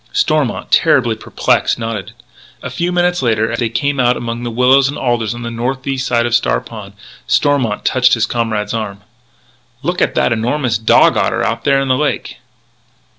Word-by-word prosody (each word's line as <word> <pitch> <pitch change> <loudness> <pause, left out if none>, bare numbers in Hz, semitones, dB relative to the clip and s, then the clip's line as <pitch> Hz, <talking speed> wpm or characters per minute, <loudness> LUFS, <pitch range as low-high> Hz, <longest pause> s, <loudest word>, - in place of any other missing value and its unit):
Stormont, - - 0
terribly - - +3
perplexed, - - 0
nodded. 115 -4 -5 0.5
A - - -5
few 175 +1 -2
minutes 175 -1 +1
later, 110 -2 0
as 115 - -3
they 120 -2 0
came 140 +4 -1
out 125 -1 +2
among 115 0 -5
the 120 - -4
willows 130 +3 +3
and 145 - -5
alders 120 -3 -1
on 120 - -7
the 120 - -5
northeast 130 +3 -3
side 120 -1 +1
of 120 - -2
Star 120 - +2
Pond, 105 -4 -11 0.3
Stormont 135 -8 +1
touched 130 0 +3
his 115 - +1
comrade's 110 -3 -2
arm. 105 -3 -4 0.8
"Look 175 +1 -2
at - - +1
that - - +2
enormous 120 0 -1
dog 110 - +4
otter - - 0
out 115 +1 -2
there 140 -1 +3
in 135 - -1
the 130 -1 +2
lake!" 150 -4 -2
120 Hz, 180 wpm, -16 LUFS, 115-135 Hz, 0.8 s, dog